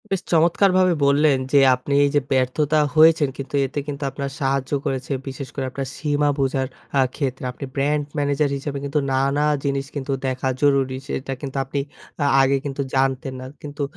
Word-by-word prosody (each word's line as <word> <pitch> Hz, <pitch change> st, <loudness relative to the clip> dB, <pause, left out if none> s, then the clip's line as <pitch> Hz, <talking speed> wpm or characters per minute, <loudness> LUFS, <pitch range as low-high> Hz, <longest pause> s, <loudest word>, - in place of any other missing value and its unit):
বেশ 195 Hz, -2 st, -1 dB
চমৎকারভাবে 180 Hz, +2 st, +4 dB
বললেন, 140 Hz, 0 st, +4 dB, 0.2 s
যে -, -, +6 dB, 0.2 s
আপনি 130 Hz, +3 st, -4 dB
এই 145 Hz, -, +3 dB
যে 145 Hz, -, +4 dB
ব্যর্থতা 135 Hz, +4 st, +2 dB, 0.2 s
হয়েছেন 155 Hz, -2 st, +6 dB
কিন্তু 135 Hz, +1 st, -5 dB
এতে 135 Hz, +2 st, -4 dB
কিন্তু 145 Hz, 0 st, -5 dB
আপনার 140 Hz, +1 st, -4 dB
সাহায্য 135 Hz, -1 st, 0 dB
করেছে 135 Hz, -1 st, -3 dB, 0.2 s
বিশেষ 135 Hz, 0 st, -5 dB
করে 135 Hz, -, -2 dB
আপনার 135 Hz, 0 st, -4 dB
সীমা 145 Hz, 0 st, +1 dB
বোঝার 135 Hz, -1 st, 0 dB, 0.3 s
অ্যা 135 Hz, -1 st, +4 dB
ক্ষেত্রে 135 Hz, -3 st, -3 dB
আপনি 140 Hz, -, -7 dB
ব্র্যান্ড 145 Hz, +2 st, +1 dB
ম্যানেজার 145 Hz, 0 st, +1 dB
হিসাবে 140 Hz, +1 st, -5 dB
কিন্তু 140 Hz, +2 st, 0 dB
নানা 140 Hz, +2 st, +1 dB, 0.2 s
জিনিস 140 Hz, -1 st, -1 dB
কিন্তু 140 Hz, -1 st, -3 dB, 0.2 s
দেখা 130 Hz, 0 st, -2 dB
জরুরি 135 Hz, -2 st, +2 dB
সেটা 135 Hz, +1 st, -3 dB
কিন্তু 140 Hz, -1 st, -5 dB
আপনি 135 Hz, +2 st, -3 dB, 0.4 s
অ্যা 145 Hz, -, +1 dB
আগে 135 Hz, +1 st, +3 dB
কিন্তু 140 Hz, 0 st, -3 dB
জানতেন 135 Hz, 0 st, 0 dB
না 130 Hz, -, -7 dB, 0.2 s
কিন্তু 145 Hz, 0 st, -5 dB
140 Hz, 175 wpm, -22 LUFS, 135-145 Hz, 0.4 s, যে